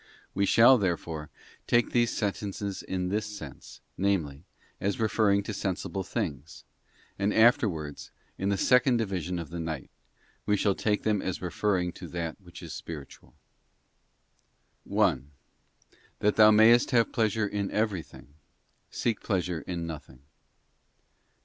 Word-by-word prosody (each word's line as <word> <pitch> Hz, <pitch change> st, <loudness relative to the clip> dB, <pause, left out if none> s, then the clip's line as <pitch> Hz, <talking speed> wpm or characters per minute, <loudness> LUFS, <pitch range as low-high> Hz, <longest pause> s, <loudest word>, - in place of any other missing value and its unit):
We 100 Hz, +1 st, +1 dB
shall, 120 Hz, +4 st, +7 dB
therefore, 85 Hz, -5 st, -2 dB, 0.4 s
take 120 Hz, 0 st, +2 dB
these 120 Hz, -1 st, +3 dB
sentences 100 Hz, -1 st, -3 dB
in 90 Hz, -1 st, -3 dB
this 105 Hz, +2 st, -1 dB
sense, 105 Hz, -1 st, -10 dB, 0.2 s
namely, 90 Hz, -6 st, -1 dB, 0.3 s
as 100 Hz, +2 st, -1 dB
referring 110 Hz, -2 st, +2 dB
to 110 Hz, -, -5 dB
sensible 95 Hz, 0 st, -3 dB
things, 75 Hz, -3 st, -5 dB, 0.6 s
and 100 Hz, +1 st, +1 dB
after 110 Hz, 0 st, +5 dB
wards, 75 Hz, -4 st, -7 dB, 0.3 s
in 95 Hz, -, -2 dB
the 100 Hz, -, +1 dB
second 125 Hz, +3 st, +4 dB
division 90 Hz, -5 st, -2 dB
of 85 Hz, -3 st, -6 dB
the 85 Hz, -, -5 dB
night, 80 Hz, -4 st, -5 dB, 0.6 s
we 105 Hz, -, +3 dB
shall 100 Hz, 0 st, +2 dB
take 105 Hz, +1 st, -1 dB
them 105 Hz, -3 st, +1 dB
as 95 Hz, -, -3 dB
referring 90 Hz, 0 st, -1 dB
to 90 Hz, -, -10 dB
that 85 Hz, +2 st, -5 dB
which 90 Hz, -2 st, -12 dB
is -, -, -7 dB
spiritual. 75 Hz, -4 st, -9 dB, 1.5 s
1. 65 Hz, +3 st, +1 dB, 0.9 s
That 105 Hz, 0 st, +1 dB
thou 110 Hz, -1 st, +8 dB
mayest 110 Hz, +3 st, +6 dB
have 115 Hz, -2 st, +2 dB
pleasure 110 Hz, -1 st, +1 dB
in 100 Hz, -1 st, -2 dB
everything, 100 Hz, -9 st, -3 dB, 0.6 s
seek 115 Hz, -3 st, -2 dB
pleasure 90 Hz, -4 st, -1 dB
in 85 Hz, -2 st, -4 dB
nothing. 70 Hz, -5 st, -9 dB
100 Hz, 135 wpm, -28 LUFS, 85-105 Hz, 1.5 s, thou